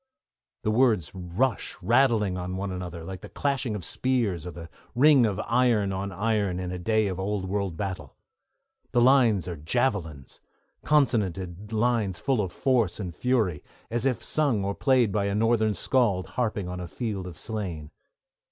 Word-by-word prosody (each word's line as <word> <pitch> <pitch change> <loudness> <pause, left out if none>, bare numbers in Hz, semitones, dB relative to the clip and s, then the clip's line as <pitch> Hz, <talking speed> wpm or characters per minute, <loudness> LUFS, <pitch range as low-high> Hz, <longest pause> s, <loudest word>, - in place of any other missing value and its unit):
The 110 - +1
words 110 - +2
rush 95 +6 -2
rattling 115 -2 +3
on 90 0 -4
one 100 0 -3
another, 90 -2 -6
like 95 +2 -7
the - - -10
clashing 135 -6 -1
of 95 -5 -5
spears 110 -11 0
or - - -5
the 85 -1 -9 0.3
ring 135 -2 +6
of 100 -4 -3
iron 115 -6 +2
on 100 +1 -3
iron 100 -1 0
in 90 -1 -4
a 90 - -4
day 110 +3 +1
of 95 -2 -3
old 100 0 -2
world 95 -3 -2
battle. 95 -3 -5 0.8
The 120 - +4
lines 120 -8 +4
are 90 - -4
javelins, 80 - -2 0.4
consonanted 105 - 0
lines 110 -4 +1
full 130 +2 +1
of 95 -3 -3
force 120 -7 +1
and 90 -4 -4
fury, 110 - 0 0.3
as 120 0 -1
if 130 - -1
sung 135 -10 +1
or 100 - -1
played 125 -3 +2
by 100 0 0
a 100 0 -1
northern 110 -1 +2
skald 100 -3 +1
harping 110 -6 -2
on 90 0 -5
a 90 - -5
field 100 -2 -4
of 85 -3 -9
slain. 90 -9 -5
100 Hz, 170 wpm, -26 LUFS, 90-120 Hz, 0.8 s, ring